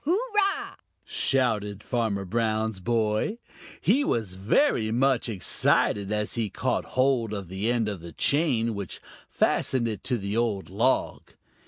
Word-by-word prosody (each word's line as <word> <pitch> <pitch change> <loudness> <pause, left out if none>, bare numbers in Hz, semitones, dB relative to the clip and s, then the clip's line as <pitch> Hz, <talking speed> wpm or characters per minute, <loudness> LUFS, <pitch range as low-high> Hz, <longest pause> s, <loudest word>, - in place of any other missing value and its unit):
"Hurrah!" 400 - 0 0.3
shouted 110 -6 0
Farmer 110 -5 -1
Brown's 110 0 -1
boy. 110 - 0 0.4
He 285 +4 +3
was 110 - -1
very 110 - +2
much 125 +1 +2
excited, 100 +1 +1
as 105 0 -1
he 115 -3 -1
caught - - -1
hold 130 -4 +2
of 100 -4 -5
the 100 +5 -1
end 120 -3 +1
of 100 -5 -4
the 85 0 -9
chain, 125 - +1
which 100 -3 -6 0.3
fastened 125 -3 +1
it 105 -4 -4
to 125 - 0
the 100 0 -3
old 110 -6 -1
log. 115 +7 0
110 Hz, 140 wpm, -26 LUFS, 100-125 Hz, 0.4 s, He